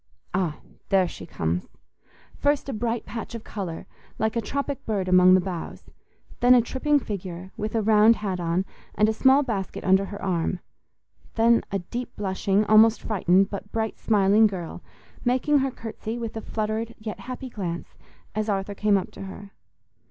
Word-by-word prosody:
Ah! 175 -5 0 0.3
There 190 -2 +4
she - - -9
comes. 85 - -2 0.7
First 290 0 +1
a 275 - -3
bright 230 +1 -2
patch 230 0 -6
of 225 - -7
colour, 185 -6 -6 0.3
like 220 +1 0
a 230 - +1
tropic 280 +2 -3
bird 200 -4 -1
among 185 0 +7
the - - +5
boughs; 180 -2 -6 0.5
then 250 +1 +6
a 245 - +6
tripping 290 +5 +1
figure, 190 -5 -6
with 215 +2 -4
a 220 - +1
round 215 +1 +6
hat 195 -4 -3
on, 175 +2 0 0.3
and 210 - +4
a 220 - +1
small 265 +5 +5
basket 205 -7 -4
under 190 +1 +4
her 200 0 -8
arm; 180 -1 -1 0.8
then 230 +1 +4
a 195 - +1
deep 240 +7 -6
blushing, 200 +1 0
almost 220 +2 +5
frightened, 195 -2 +2
but 205 0 -6
bright 220 -1 -2
smiling 210 0 +4
girl, 180 -5 -6 0.4
making 260 +4 +2
her 270 0 +1
curtsy 225 -1 -6
with 230 -2 -5
a 220 - -4
fluttered 220 +2 -3
yet 215 -1 -6
happy 255 +1 -7
glance, 175 -6 -5 0.4
as 215 0 -2
Arthur 195 0 -1
came 205 0 +2
up 190 - -4
to - - -11
her. 200 +1 -10
210 Hz, 175 wpm, -25 LUFS, 190-230 Hz, 0.8 s, among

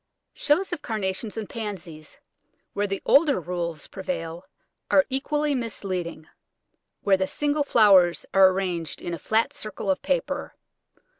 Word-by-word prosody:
Shows 345 +6 +1
of 345 - -4
Carnations 210 0 -3
and 220 -2 -4
Pansies, 180 -9 -7 0.6
where 205 0 0
the 195 0 -4
older 285 - +5
rules 170 -2 -4
prevail, 175 -5 -5 0.4
are 285 - +5
equally 295 +2 0
misleading, 185 - -4 0.7
where 195 -2 +3
the 190 0 0
single 295 +4 0
flowers 195 -9 +5
are 195 -1 +7
arrayed 180 -5 -3
in 175 - -5
a 170 - -4
flat 220 +8 +1
circle 210 -2 -3
of 190 - -1
paper. - - -2
195 Hz, 135 wpm, -25 LUFS, 180-265 Hz, 0.7 s, are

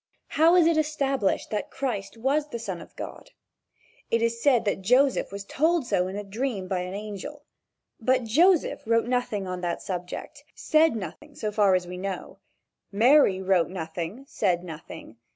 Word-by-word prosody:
How 330 +3 +4
is 350 -2 +6
it 330 -1 +3
established 275 -8 0
that 210 - -2
Christ 235 -6 -4
was 280 +6 0
the 235 - -4
son 195 -7 -5
of - - -14
God? - - -8 0.8
It 230 0 +1
is 230 0 0
said 250 -5 +3
that 200 -1 0
Joseph 255 +6 +3
was 200 0 -6
told 320 +5 +1
so 180 -5 +1
in 190 - -6
a 205 - -4
dream 205 -1 -3
by 185 -1 -1
an 180 +1 -5
angel. 210 +8 -7 0.6
But 255 +2 +2
Joseph 325 - +3
wrote 230 0 +3
nothing 240 -5 -1
on 180 -1 -4
that 175 -1 -3
subject 180 -2 -6
said 315 -3 +3
nothing 225 - -8
so 215 -5 -3
far 205 -3 +4
as 180 -1 0
we 180 +1 -7
know. 190 -1 -5 0.5
Mary 215 -3 +4
wrote 185 -3 +2
nothing, 175 +7 -5
said 180 -8 0
nothing. 155 -8 -10
215 Hz, 170 wpm, -26 LUFS, 185-270 Hz, 0.8 s, is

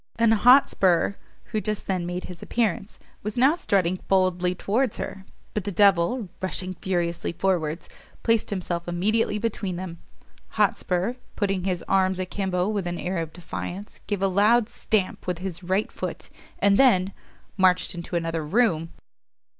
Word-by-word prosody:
An 230 -1 +3
Hotspur, 210 -7 +5 0.4
who 215 -2 0
just 215 -1 -2
then 185 -3 -1
made 180 +1 -4
his 180 -2 -9
appearance, 215 -4 -1 0.2
was 210 +2 -5
now 265 +5 +5
strutting 185 - +1
boldly 185 -1 +2
towards 225 +6 0
her; 195 -1 -6 0.3
but 210 - -2
the 205 - -3
devil, 200 +4 +3
rushing 185 0 -3
furiously 175 -2 -2
forwards, 170 -2 -1 0.4
placed 230 -2 +2
himself 175 -3 -3
immediately 210 +5 +1
between 205 -4 -2
them. 175 -2 -6 0.6
Hotspur, 185 +5 +1 0.2
putting 195 -3 -1
his 180 -3 -1
arms 190 -1 +2
a 185 - -1
kimbo 185 -1 -1
with 205 -4 -1
an 175 0 -3
air 185 +1 -3
of 165 -1 -4
defiance, 180 +3 -7
gave 200 -2 -1
a - - +4
loud 210 +4 +3
stamp 200 -4 -1
with 180 -2 -1
his 180 -1 -5
right 190 +4 0
foot, - - -6 0.3
and 200 0 +3
then 200 -8 +4 0.4
marched 185 -1 +3
into 175 0 -6
another 165 -1 -1
room! 165 -2 +1
190 Hz, 155 wpm, -25 LUFS, 175-210 Hz, 0.6 s, Hotspur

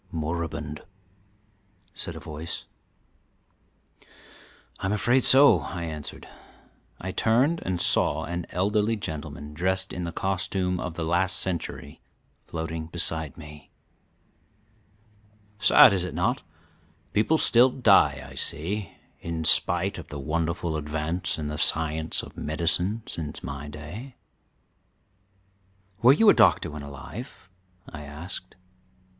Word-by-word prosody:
"Moribund," 80 -2 -4 1.1
said - - -2
a - - -7
voice. 80 +2 -7 2.1
"I'm 95 - -2
afraid 120 +5 +2
so," 140 +2 +7
I 85 -2 -6
answered. 75 -3 -7 0.7
I 95 - -4
turned 130 - +2
and 90 -1 -2
saw - - +2
an 85 0 -4
elderly 105 +5 +1
gentleman, 75 -5 -6
dressed 95 +3 -1
in 90 - -4
the 85 - -3
costume 90 0 -1
of 90 -2 -5
the 85 -2 -3
last 90 +3 +1
century, 85 -5 -4 0.5
floating 80 -1 -5
beside 80 -3 -1
me. 75 -2 -12 1.9
"Sad, 100 0 +7
is 95 -2 +1
it 90 - -5
not? - - 0 0.7
People 110 +10 +3
still 125 -3 +5
die, 125 0 +3
I - - -12
see, 95 +7 -3 0.3
in 85 -1 -4
spite 90 +4 +4
of 85 - -10
the 75 - -7
wonderful 85 +2 -2
advance 75 +4 -3
in 75 -1 -4
the 75 0 -3
science 80 0 +2
of - - -11
medicine 90 +7 0
since 75 -3 -6
my 70 +2 -6
day." 85 - -9 1.9
"Were 120 - +8
you 215 +10 +3
a - - +9
doctor 90 -6 +4
when 75 0 -7
alive?" 80 - -9 0.4
I 80 - -9
asked. 75 +6 -7
85 Hz, 120 wpm, -26 LUFS, 75-95 Hz, 2.1 s, a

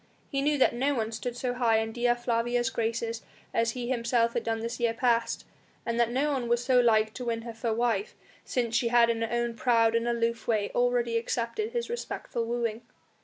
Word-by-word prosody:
He 275 - -1
knew 295 +1 +2
that 265 - +4
no 275 +4 +1
one 225 -2 -1
stood 240 +2 -4
so 245 0 -1
high 235 -3 +2
in 220 0 -1
Dea 240 +1 +2
Flavia's 240 0 0
graces 230 0 -2 0.3
as 230 0 +1
he 245 -2 -4
himself 235 -1 +1
had 235 - -1
done 225 -1 -1
this 230 +1 -4
year 235 -1 +1
past, 235 -1 +1 0.4
and 235 0 -1
that 235 -1 +3
no 275 +5 +1
one 255 -3 -2
was 240 +1 +1
so 255 -1 +4
like 220 -2 +3
to 250 - -6
win 230 -1 -2
her 235 -1 -6
for 225 +1 -2
wife, 240 - 0 0.3
since 235 -3 -1
she 240 - +2
had 235 0 +5
in 230 -1 -3
her 230 - -1
own 240 0 0
proud 230 -1 +3
and 230 +1 +1
aloof 235 0 -1
way 215 -3 +1
already 245 -1 +1
accepted 235 - -2
his 475 -1 -1
respectful 285 - -4
wooing. 230 -1 -2
235 Hz, 215 wpm, -28 LUFS, 230-245 Hz, 0.4 s, had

